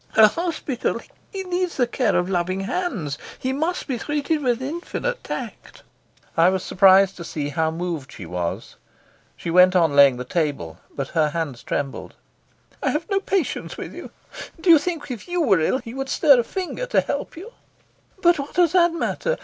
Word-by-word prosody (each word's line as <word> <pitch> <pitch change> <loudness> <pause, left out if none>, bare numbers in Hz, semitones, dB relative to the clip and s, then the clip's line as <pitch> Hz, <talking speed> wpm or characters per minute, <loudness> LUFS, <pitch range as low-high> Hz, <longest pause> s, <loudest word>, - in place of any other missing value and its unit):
"A 215 -1 +9
hospital! 310 -5 -2 0.3
He 390 -2 -4
needs 360 -1 -2
the 250 - +3
care 240 0 0
of 180 - +1
loving 185 +1 -1
hands. 195 - -3 0.2
He 260 +1 -2
must 320 +6 -2
be 255 -4 -3
treated 295 +3 -1
with 245 -3 +1
infinite 345 - -4
tact." - - -7 0.5
I 165 +2 +5
was 190 -1 -1
surprised 195 0 +5
to 170 - -7
see 150 -3 -4
how 160 +2 0
moved 165 -4 -4
she 95 - -9
was. 85 0 -4 0.6
She 170 - -4
went 180 +1 +6
on 165 -5 +3
laying 140 -3 +7
the 125 - -4
table, 130 - -2 0.2
but 140 -1 -4
her 155 -2 +2
hands 150 -6 -4
trembled. 140 -2 -4 0.7
"I - - +1
have 315 +7 -3
no 395 - +3
patience 385 -6 -2
with - - -7
you. - - -9 0.5
Do 340 +1 +4
you 320 - +8
think 320 -3 -4
if 240 - -7
you 355 0 -1
were 215 - +4
ill 160 +10 +1
he 235 -3 -9
would 270 +1 -4
stir 280 -6 +5
a - - +2
finger 380 - -4
to - - +3
help - - -4
you?" 400 +8 -9 0.7
"But 345 -2 +5
what 280 - -6
does 350 -3 +4
that 350 -2 +4
matter? - - -1
240 Hz, 190 wpm, -22 LUFS, -, 0.7 s, A